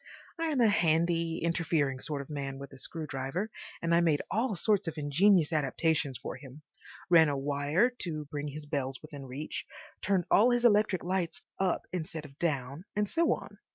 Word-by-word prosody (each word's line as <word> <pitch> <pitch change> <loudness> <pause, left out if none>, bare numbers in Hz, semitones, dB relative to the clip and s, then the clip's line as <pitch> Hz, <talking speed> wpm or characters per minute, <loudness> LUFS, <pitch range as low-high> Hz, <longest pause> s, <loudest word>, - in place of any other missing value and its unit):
I 330 - 0
am 290 -5 +1
a 230 - +6
handy, 165 -3 +2
interfering 165 -5 +1
sort 145 0 -3
of - - -19
man 135 -2 -4
with 140 0 -9
a 135 - -12
screw 160 +3 -5
driver, 145 +9 -3 0.3
and 170 0 +2
I 170 - +6
made 160 -4 +2
all 225 +1 +1
sorts 200 0 +1
of 165 -1 -4
ingenious 165 +3 +3
adaptations 150 -1 +1
for - - -6
him—ran 150 +4 0
a 140 - -1
wire 145 - +1
to 155 -4 -3
bring 145 0 -4
his 150 +1 -6
bells 135 -3 -2
within 145 -3 -9
reach, 140 +5 -5 0.4
turned 190 -3 +1
all 225 +5 +6
his 245 0 +2
electric 210 -4 +4
lights 175 -5 -2 0.2
up 190 -2 +1
instead 160 -3 -4
of 140 0 -14
down, 140 0 -2
and 210 0 +1
so 335 +10 +2
on. - - -4
160 Hz, 185 wpm, -30 LUFS, 145-185 Hz, 0.4 s, a